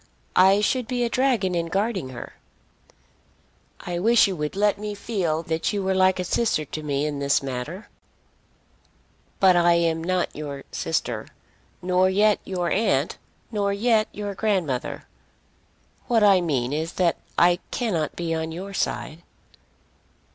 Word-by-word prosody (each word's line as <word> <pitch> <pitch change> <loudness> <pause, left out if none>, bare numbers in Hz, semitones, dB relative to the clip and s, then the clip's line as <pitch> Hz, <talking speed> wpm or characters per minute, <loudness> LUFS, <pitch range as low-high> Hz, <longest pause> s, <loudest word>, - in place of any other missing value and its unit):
I 195 +2 +5
should 250 +2 0
be 245 -1 -1
a 235 - 0
dragon 240 -8 +1
in 170 -1 -1
guarding 195 - -1
her." 125 -2 -9 1.5
"I 175 -1 -4
wish 230 +5 +5
you 195 - -2
would 150 +1 -4
let 205 0 +2
me 210 0 -4
feel 180 -7 -2
that 160 +4 -1
you 200 -1 -1
were 190 0 +1
like 185 0 +3
a - - 0
sister 180 -4 0
to 155 - -6
me 145 -1 -1
in 145 -2 -3
this 140 0 +1
matter." 135 - -5 1.5
"But 190 -2 +6
I 175 0 +5
am 165 -1 +1
not 185 +1 -1
your 145 -2 -6
sister, - - -2 0.6
nor 185 +1 +3
yet 205 +2 +3
your 180 -2 -2
aunt, 160 -9 +1 0.3
nor 200 -2 0
yet 220 +1 +2
your 205 -1 -5
grandmother. 185 - -1 1.0
What 230 -3 +3
I 195 -3 +6
mean 135 -6 -1
is 160 +3 -2
that 175 -2 +1 0.2
I 175 +1 +4
cannot 180 -11 -2
be 170 -1 -2
on 160 0 -2
your 190 +4 -7
side." 165 -3 -3
185 Hz, 150 wpm, -24 LUFS, 160-205 Hz, 1.5 s, But